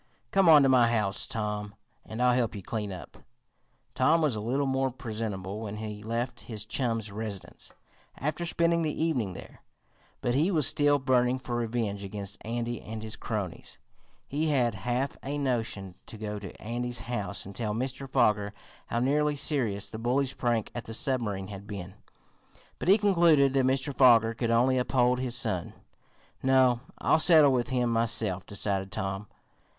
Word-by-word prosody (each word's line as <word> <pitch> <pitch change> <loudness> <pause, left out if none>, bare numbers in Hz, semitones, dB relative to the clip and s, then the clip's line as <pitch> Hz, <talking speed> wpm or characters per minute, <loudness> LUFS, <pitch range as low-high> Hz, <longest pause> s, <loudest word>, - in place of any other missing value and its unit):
Come 195 -3 +4
on 150 -3 +8
to - - +4
my 125 -2 +5
house, 105 -4 -1
Tom, 105 -2 -4 0.3
and 110 +3 -4
I'll 125 0 +5
help 120 -3 0
you 100 - -7
clean 105 -1 -4
up." 90 -2 -9 0.8
Tom 165 +2 +3
was 150 -7 +1
a - - -3
little 130 +6 0
more 135 0 +1
presentable 110 -6 -5
when 105 -1 -5
he 105 -1 -6
left 115 +3 -3
his 105 -2 -5
chum's 115 -3 -1
residence, 105 -2 -7 0.5
after 150 +5 -2
spending 170 0 +1
the 155 -2 -2
evening 130 - 0
there, - - -12 0.6
but 120 - 0
he 150 +8 +2
was 160 -7 +2
still 145 +3 +4
burning 130 -2 +2
for 125 -2 -5
revenge 115 -4 -2
against 100 +1 -6
Andy 120 0 -3
and 110 0 -7
his 110 -1 -4
cronies. 105 -6 -5 0.5
He 155 +3 -1
had 125 -6 +2
half 125 +6 -2
a 145 +2 -4
notion 115 -8 -2
to 110 - -9
go 105 -1 -4
to 95 -3 -10
Andy's 120 +2 -3
house 100 -5 -4
and 100 0 -10
tell 105 -3 -2
Mr. 130 +3 -4
Foger 105 -6 +2 0.3
how 115 - -1
nearly 150 +3 +2
serious 120 -9 0
the 110 - -8
bully's 130 +3 0
prank 120 -3 -1
at 120 - -6
the 115 - -3
submarine 105 -8 -1
had 100 0 -9
been, 95 -3 -7 0.9
but - - -4
he 200 - +7
concluded 170 -9 +4
that 135 -1 +3
Mr. 135 +1 0
Foger 115 -3 +6
could 115 0 -2
only 125 +3 +3
uphold 125 0 +2
his 125 -2 -1
son. - - -1 0.7
"No, 130 -2 +4 0.2
I'll - - +3
settle 155 -4 +6
with 125 -2 +1
him 125 -2 +1
myself," 115 -5 0
decided 100 -1 -2
Tom. 95 -1 -4
120 Hz, 170 wpm, -28 LUFS, 105-135 Hz, 0.9 s, on